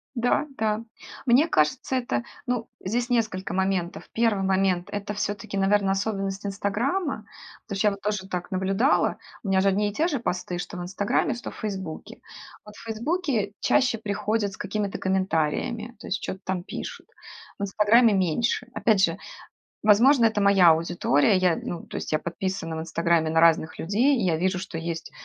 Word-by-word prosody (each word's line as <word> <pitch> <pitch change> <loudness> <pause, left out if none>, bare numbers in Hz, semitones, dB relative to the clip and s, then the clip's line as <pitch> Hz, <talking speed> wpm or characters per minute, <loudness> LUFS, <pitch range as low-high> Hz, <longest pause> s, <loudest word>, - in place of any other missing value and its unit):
Да, 245 +5 +1
да. 215 0 0 0.4
Мне 270 +6 +4
кажется, 155 +12 +1
это, 180 - -1 0.2
ну, 245 -2 -2 0.2
здесь 235 +5 -1
несколько 215 -7 -1
моментов. 190 -2 -1
1 225 -4 +1
момент- 190 -2 +1
это 205 0 -4
всё-таки, 205 0 -3
наверно, 195 0 +2
особенность 195 -1 -2
"Инстаграма", 215 - -1 0.4
потому 200 - -6
что 210 - +2
я - - +3
вот 200 - -8
тоже 205 -2 -2
так 180 -2 -4
наблюдала. 195 +8 +2 0.3
У 205 - -6
меня 190 0 +3
же 195 - +3
одни 205 +2 +2
и - - -4
те 320 - +1
же 280 -7 -1
посты, 180 -4 -3
что 175 - -6
в 180 - -5
"Инстаграме", 190 +6 0
что 240 - -7
в - - -13
"Фейсбуке". 190 -7 -6 0.5
Вот 210 0 -12
в - - -12
"Фейсбуке" 230 - -1
чаще 255 -3 +2
приходят 210 0 -1
с - - -10
какими-то 205 0 -3
комментариями, 190 +5 -1
то - - -11
есть 195 - -1
чё-то 190 - -5
там 185 -2 -2
пишут. - - -7 0.5
В - - -6
"Инстаграме" 210 +3 +4
меньше. 195 +7 +1
Опять 215 -4 +3
же, - - +2 0.7
возможно, 235 +5 +6
это 220 -2 +2
моя 195 -3 +6
аудитория. 165 +2 +3
Я, 180 -2 +3
ну, 170 - -5
то - - -9
есть - - -5
я 155 - +2
подписана 170 -1 -4
в - - -4
"Инстаграме" 170 -1 +1
на 165 - +3
разных 165 -1 +3
людей, 235 - +2
и 210 - 0
я 165 -3 +2
вижу, 185 +1 0
что 190 -4 -6
есть 165 0 -5
200 Hz, 180 wpm, -25 LUFS, 185-225 Hz, 0.7 s, возможно